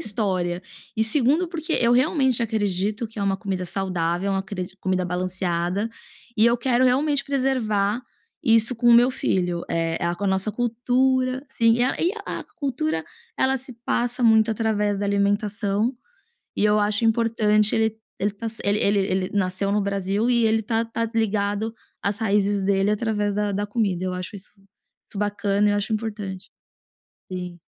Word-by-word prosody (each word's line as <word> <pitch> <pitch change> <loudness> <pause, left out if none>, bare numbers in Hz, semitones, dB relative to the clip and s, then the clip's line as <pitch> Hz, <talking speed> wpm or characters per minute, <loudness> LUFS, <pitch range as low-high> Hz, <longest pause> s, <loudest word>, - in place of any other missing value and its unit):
história. 185 -4 -1 0.3
E 220 - +2
2º 290 +9 +2
porque 325 -1 -4
eu 235 0 +4
realmente 260 0 +3
acredito 210 -1 -1
que 220 -1 -11
é - - -1
uma 195 -1 +1
comida 190 -2 -3
saudável, 180 0 -1
é - - +1
uma 195 0 0
cri 190 -2 -4 0.2
comida 185 -1 0
balanceada, 180 +2 -2 0.5
e 220 - +5
eu 235 +1 +4
quero 245 +1 +2
realmente 280 +3 +2
preservar 245 -6 0 0.4
isso 230 0 +4
com 240 +1 -1
o - - +8
meu 240 +2 +6
filho, 180 -7 -1
eh, 165 0 -1
a 170 0 0
com 180 - -5
a - - +1
nossa 190 +2 0
cultura, 255 +3 0
sim, 230 -1 +3
a 255 - +1
e 350 +3 +2
a - - -4
cultura 195 - -2 0.3
ela 265 0 +2
se 265 0 -7
passa 245 +1 -1
muito 220 -1 +5
através 210 -2 0
da - - -1
alimentação, 205 +2 0 0.6
e - - 0
eu 210 0 +4
acho 210 +1 +1
importante 220 -2 +3
ele 220 0 +1 0.2
ele 205 +2 0
ta 210 +3 -6
se 225 0 -5
ele 205 +1 +2
ele 200 0 +3
ele 190 -1 0
nasceu 195 0 0
no 205 +1 +1
Brasil 200 +3 -1
e 235 -2 +3
ele 220 0 +2
tá 225 +1 -1
tá 230 0 -3
ligado 215 0 0 0.3
às 200 +1 -1
raízes 205 -2 +1
dele 195 +1 +2
através 210 -1 0
da 210 0 0
da 205 +1 -1
comida, 200 -4 -1
eu 185 - -2
acho 180 +3 -6
isso 195 0 -11 0.5
isso - - -9
bacana 205 0 +1
e - - +3
eu - - +1
acho 205 +2 -3
importante. 210 -4 -4 0.8
Sim. 180 -1 -6
210 Hz, 175 wpm, -23 LUFS, 195-230 Hz, 0.8 s, o